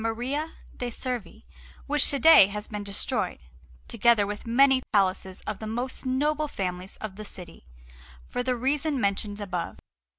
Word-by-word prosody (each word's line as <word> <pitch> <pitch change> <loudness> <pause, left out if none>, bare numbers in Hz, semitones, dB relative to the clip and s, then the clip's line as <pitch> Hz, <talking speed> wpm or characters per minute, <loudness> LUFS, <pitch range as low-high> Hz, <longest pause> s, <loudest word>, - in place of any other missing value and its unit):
Maria 255 +8 -2 0.2
de' 245 - -3
Servi, 245 -1 -5 0.4
which 295 -1 +2
to 280 - +2
day 320 -9 +8
has 210 +1 -5
been 210 -1 -5
destroyed, 200 0 -2 0.5
together 225 - +3
with 205 +2 -6
many 265 +2 +5
palaces 190 -1 +1
of 210 -2 -5
the 220 - -6
most 245 +4 -4
noble 300 +4 +1
families 185 -5 -5
of 205 -3 -7
the 215 - -6
city, 175 - -11 0.6
for - - -3
the 250 0 0
reasons 275 +3 0
mentioned 205 0 -1
above. 185 -4 -4
225 Hz, 155 wpm, -27 LUFS, 200-265 Hz, 0.6 s, day